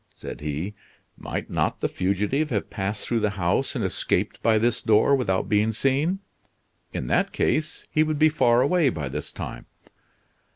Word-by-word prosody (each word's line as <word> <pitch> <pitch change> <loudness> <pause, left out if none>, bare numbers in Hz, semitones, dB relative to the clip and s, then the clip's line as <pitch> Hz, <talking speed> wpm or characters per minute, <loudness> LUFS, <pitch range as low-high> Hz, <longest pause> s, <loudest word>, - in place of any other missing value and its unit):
said - - -8
he. 75 +7 -3 0.4
"Might - - -5
not - - -1
the - - +1
fugitive 105 +11 0
have 105 -7 -2
passed 100 +1 -3
through 120 - 0
the 105 -1 +1
house 95 +11 0
and 115 -6 -1
escaped 95 - -1
by 110 -1 +4
this 120 +2 +1
door, 110 +6 +4
without 95 -8 0
being 105 +1 +2
seen? 140 - +1 0.7
In - - -4
that - - +1
case 155 0 -1
he 155 - +3
would 155 -1 +1
be 155 +1 +6
far 125 -5 +3
away 160 0 +3
by 75 - -4
this 75 +2 -5
time." - - -7
115 Hz, 170 wpm, -25 LUFS, 100-140 Hz, 0.7 s, be